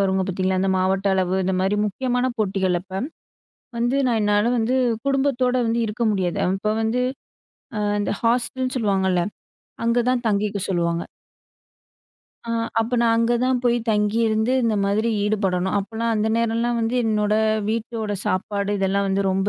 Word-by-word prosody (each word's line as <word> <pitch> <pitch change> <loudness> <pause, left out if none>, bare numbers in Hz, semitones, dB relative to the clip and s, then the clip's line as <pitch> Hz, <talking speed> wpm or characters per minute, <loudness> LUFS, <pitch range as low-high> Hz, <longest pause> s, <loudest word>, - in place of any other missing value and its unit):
வருங்க 190 0 +1
பாத்தீங்களா? 185 0 0
இந்த 195 - +1
மாவட்ட 190 +1 0
அளவு, 185 -1 0
இந்த 190 +1 0
மாரி 195 +2 +1
முக்கியமான 250 +4 -1
போட்டிகள் 190 -4 +1
அப்ப, 190 +2 -5 0.8
வந்து 240 +3 +1
நான் 230 -2 +1
என்னால 210 +3 +2
வந்து 235 +3 +1 0.3
குடும்பத்தோட 265 -2 +1
வந்து 230 +1 0
இருக்க 220 +3 -3
முடியாது. 185 -4 -1
அப்ப 195 +3 0
வந்து 230 +3 0 0.8
அ - - -1 0.2
இந்த 205 - -1
ஹாஸ்டல்னு 250 +2 0
சொல்லுவாங்கள்ல. 190 -5 +1 0.6
அங்க 235 +1 +2
தான் 245 -1 -1
தங்கிக்க 205 -1 0
சொல்லுவாங்க. 170 -2 0 1.4
அ - - -4 0.3
அப்ப 235 +2 -1
நான் 230 -1 +3
அங்க 230 +1 +2
தான் 255 -1 +1
போயி 240 -1 +2
தங்கியிருந்து, 220 +2 +1
இந்த 225 -2 +2
மாதிரி 210 +3 +1 0.2
ஈடுபடணும். 190 -3 0
அப்பலாம் 225 +3 -2
அந்த 215 +1 +1
நேரலாம் 230 +1 0
வந்து 230 +2 0
என்னோட 210 -1 +1 0.4
வீட்டோட 225 -1 -3
சாப்பாடு 200 +2 -1
இதெல்லாம் 195 +1 +1
வந்து 195 +1 +1
ரொம்ப 190 +1 0
215 Hz, 150 wpm, -22 LUFS, 195-235 Hz, 1.4 s, நான்